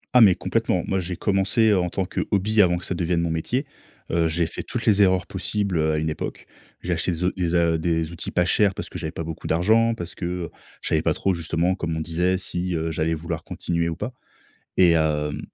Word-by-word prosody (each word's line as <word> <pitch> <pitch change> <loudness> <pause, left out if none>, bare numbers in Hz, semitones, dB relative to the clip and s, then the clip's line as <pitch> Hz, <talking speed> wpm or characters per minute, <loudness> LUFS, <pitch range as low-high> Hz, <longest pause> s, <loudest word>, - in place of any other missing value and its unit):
Ah, 125 - +8
mais 100 -5 +7
complètement. - - 0
Moi, 95 - 0
j'ai 90 0 -4
commencé 100 +4 +2
en 90 -2 +1
tant 95 +2 -2
que - - -3
hobby, 105 +2 +3
avant 90 -2 +3
que 90 - -8
ça - - -2
devienne 85 -1 0
mon 85 -1 -1
métier. 120 - -1 0.5
Heu, 85 0 +2
j'ai 85 +1 0
fait 80 - -5
toutes - - -4
les 105 -2 +4
erreurs 95 -2 +4
possibles, 95 -1 -1
heu, 80 0 +2
à - - 0
une 80 +1 -1
époque. - - -5 0.4
J'ai 90 - 0
acheté 85 +2 -1
des 85 +1 -3
o 90 - +2
des 90 -2 0
a 85 -1 +3
des 80 -1 0
outils 85 - -6
pas 90 - +1
chers 95 +2 +3
parce - - -6
que 90 - -7
j'avais 80 -1 -4
pas 85 - -5
beaucoup 80 0 -6
d'argent, 110 +8 +3
parce 85 -4 -7
que, 90 - -5
heu, 90 -1 -3 0.3
je - - -3
savais 80 - +2
pas 80 -1 +1
trop 95 - +1
justement, 85 +1 0
comme 85 -3 -3
on - - -2
disait 90 +3 0
si, 90 -1 -2
heu, 80 0 -1
j'allais 80 +1 0
vouloir 80 0 -5
continuer 85 -1 -2
ou 80 - -3
pas. 110 +8 -5 0.6
Et, 90 -2 +6
hem, 75 -2 0
85 Hz, 245 wpm, -24 LUFS, 80-95 Hz, 0.6 s, Ah